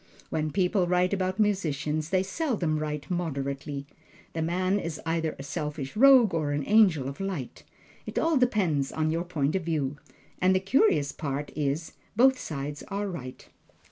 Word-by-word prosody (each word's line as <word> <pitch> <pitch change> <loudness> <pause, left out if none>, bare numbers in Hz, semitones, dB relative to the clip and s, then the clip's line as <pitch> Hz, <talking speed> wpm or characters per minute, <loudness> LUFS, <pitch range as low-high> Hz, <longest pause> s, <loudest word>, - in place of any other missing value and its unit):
When 155 -1 0
people 180 +1 +1
write 180 +2 +2
about 185 0 -1
musicians, 155 -7 0
they 185 0 +2
seldom 190 - -1
write 150 -1 -4
moderately. 140 -4 -3 0.5
The 165 - -2
man 185 +4 +1
is 165 -4 -5
either 165 -1 -1
a 135 - -7
selfish 150 -2 -4
rogue 255 -4 +7
or 155 -3 0
an 145 0 -1
angel 190 -11 +4
of 135 - -6
light 190 -10 -4 0.4
it - - -6
all 325 0 +2
depends 185 - +1
upon 155 0 0
your 165 +1 -1
point 155 -3 -1
of 190 - 0
view. 150 -4 -1 0.4
And 185 +1 +4
the - - +4
curious 185 - +3
part 145 -1 -4
is, 150 +2 -1 0.2
both 260 +3 +5
sides 145 -1 -5
are 200 +1 -2
right. 130 -9 -7
165 Hz, 165 wpm, -27 LUFS, 145-190 Hz, 0.5 s, rogue